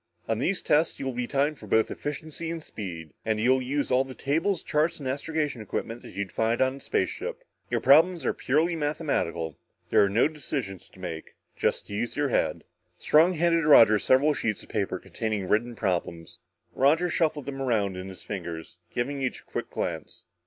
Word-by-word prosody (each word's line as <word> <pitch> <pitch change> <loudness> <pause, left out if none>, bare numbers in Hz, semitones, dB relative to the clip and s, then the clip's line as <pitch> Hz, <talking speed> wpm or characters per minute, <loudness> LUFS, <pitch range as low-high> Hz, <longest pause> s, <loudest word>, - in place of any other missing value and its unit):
"On 115 -1 0
these 185 +8 0
tests 155 +3 +2
you - - -4
will 130 - -2
be 120 0 -2
timed 145 +2 0
for 105 - -11
both 110 +2 +2
efficiency 155 +2 -5
and 165 -1 -4
speed 85 - -7
and 110 -1 0
you'll 130 +4 +3
use 140 +3 -1
all 130 +1 +4
the 130 -1 -10
tables, 165 +7 0
charts 155 +2 +1
and 140 - -6
astrogation 145 -1 -2
equipment 115 +3 -4
that - - -12
you'd 100 -2 -3
find 115 +1 0
in 130 +1 +2
a - - -11
spaceship. 480 - -2 0.3
Your - - 0
problems 165 +4 +5
are - - +2
purely 160 +6 +1
mathematical. 145 - -2 0.3
There - - +6
are 100 - +2
no 110 +8 +4
decisions 135 - -5
to - - -19
make. 80 -4 -7 0.2
Just - - -1
use 115 +6 -3
your 145 -1 +1
head." - - 0 0.3
Strong 165 +4 +4
handed 170 0 +2
Roger 110 -8 +7
several 135 +8 +4
sheets 110 -6 -2
of - - -17
paper 100 -3 -1
containing 100 +1 -3
written 120 +4 +1
problems. 85 -5 -3 0.3
Roger 160 +6 +3
shuffled 155 -5 0
them 135 0 -5
around 105 -7 +1
in 90 +1 -6
his 95 - -10
fingers, 85 -3 -6
giving 135 +3 -2
each 130 - -2
a - - -27
quick - - -5
glance. - - -4
130 Hz, 190 wpm, -27 LUFS, 105-150 Hz, 0.3 s, Roger